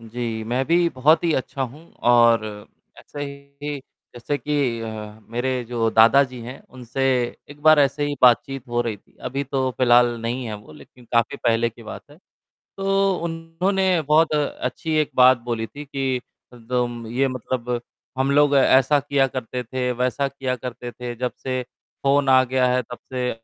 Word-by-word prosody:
जी, 115 0 -4
मैं 125 +4 -1
भी 170 +1 +3
बहुत 150 +6 +4
ही 165 - +2
अच्छा 135 +1 -3
हूँ 135 +6 -7 0.3
और 120 -1 +6 0.6
ऐसे 145 - -10 0.4
ही 145 -1 -3 0.4
जैसे 120 +4 -3
कि 140 -6 -1
अ, 110 -1 -7
मेरे 125 +1 -1
जो 115 -2 0
दादाजी 125 +3 +4
हैं, 125 +4 -9
उनसे 125 +1 -6 0.5
एक 145 0 -13
बार 155 -1 +7
ऐसे 140 +1 +1
ही 145 - -2
बातचीत 130 +2 +3
हो 120 0 0
रही 115 -3 -2
थी, - - -31
अभी 135 +2 -3
तो 130 -1 -1
फिलहाल 120 -1 +6
नहीं 120 +2 -3
हैं 110 - -4
वो, 105 -6 -12
लेकिन 75 - -16
काफ़ी 115 -1 +2
पहले 115 0 +1
की 115 +1 -15
बात 110 - -8
है। 150 - -17 0.6
तो 195 0 +1
उन्होंने 170 +2 0
बहुत 155 +2 +3
अच्छी 155 +2 -2
एक 150 - -4
बात 130 0 +7
बोली 115 -1 -2
थी 145 +6 -10
कि 135 -2 -2 0.3
दोम 120 0 -3
ये 130 +4 +1
मतलब, 125 -1 -3 0.4
हम 135 +1 +1
लोग 145 0 +4
ऐसा 135 +2 +4
किया 140 -1 +1
करते 125 -1 -5
थे, 125 +1 -2
वैसा 125 +3 0
किया 135 -2 -3
करते 125 0 -7
थे, 120 0 -7
जब 125 +1 -2
से 130 -1 -1 0.4
फोन 140 0 +3
आ 130 0 +6
गया 130 0 +1
है 125 - +2
तब 120 - -6 0.2
से 125 -1 -1
130 Hz, 175 wpm, -22 LUFS, 120-140 Hz, 0.6 s, बार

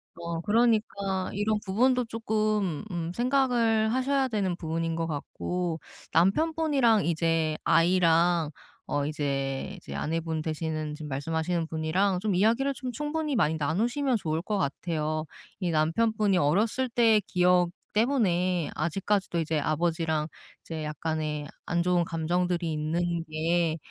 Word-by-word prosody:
어. 170 -1 -4
그러니까 205 -3 +1
이런 210 +2 +1
부분도 250 +6 +2
쪼끔 215 -6 -1
음 170 -1 -3
생각을 240 -4 +2
하셔야 265 +1 +1
되는 200 -7 -1
부분인 165 -1 -2
것 165 0 -1
같고 165 +3 -3 0.3
남편분이랑 270 - +3
이제 165 -2 +1
아이랑 170 -2 +3 0.4
어 145 -1 0
이제, 140 +1 -2
이제 175 - -9
아내분 160 0 -2
되시는 155 -1 -3
지금 155 -1 -8
말씀하시는 160 +4 -1
분이랑 175 +5 0
좀 205 0 0
이야기를 230 +9 +2
좀 255 -1 -5
충분히 295 +2 -2
많이 160 -7 +2
나누시면 235 - 0
좋을 160 -5 -2
것 205 +3 -2
같아요. 155 -1 -2 0.4
이 175 -2 0
남편분이 195 +6 +2
어렸을 210 - +1
때의 230 -2 +4
기억 180 -2 +3 0.2
때문에 185 - +1
아직까지도 190 +3 0
이제 160 -1 0
아버지랑 160 0 0 0.3
이제 160 -2 -6
약간의 150 0 -3 0.2
안 170 0 0
좋은 180 -1 +2
감정들이 170 +1 -1
있는 165 +2 -1
게 165 +1 +1
175 Hz, 300 characters per minute, -28 LUFS, 160-215 Hz, 0.4 s, 때의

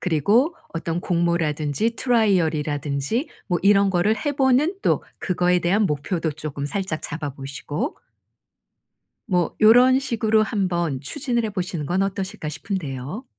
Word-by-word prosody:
그리고 205 - +2 0.2
어떤 165 +1 -2
공모라든지 170 - 0
트라이얼 205 -10 +2
이라든지 145 - -2 0.2
뭐 175 -2 0
이런 200 0 +5
거를 190 +4 +2
해 290 - +2
보는 270 +6 +2
또 - - +2 0.2
그거에 180 0 +2
대한 195 +5 +2
목표도 155 +2 -2
쪼금 145 -2 -5
살짝 185 -2 -3
잡아 155 -3 -4
보시고 145 - -5 1.3
뭐 180 -5 0
요런 245 +4 +6
식으로 220 -4 +1
한번 175 - -1
추진을 240 - -1
해보시는 180 -7 -3
건 185 +3 +1
어떠실까 195 -5 -4
싶은데요? 155 - -5
180 Hz, 305 characters per minute, -23 LUFS, 155-220 Hz, 1.3 s, 요런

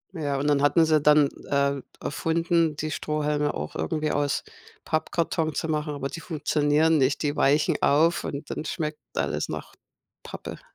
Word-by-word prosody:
Ja, 145 -4 -1
und 135 - -2
dann 145 -1 +3
hatten 155 +3 +4
sie 155 -1 +3
dann 150 0 +5 0.2
äh, 140 -1 +1 0.2
erfunden, 165 +1 0
die 155 +1 -3
Strohhalme 150 -1 -1
auch 75 - -5
irgendwie 150 - -1
aus 145 -1 0 0.4
Pappkarton 160 0 -1
zu - - -1
machen, 150 -1 -2
aber 135 -1 -3
die 170 - -7
funktionieren 155 0 +2
nicht. 135 +3 +1
Die 145 0 0
weichen 145 +2 +2
auf 165 +4 +3
und 145 +1 -5
dann - - -4
schmeckt 155 -1 -3 0.2
alles - - -1
nach - - -6 0.5
Pappe. - - -8
150 Hz, 160 wpm, -26 LUFS, 145-155 Hz, 0.5 s, dann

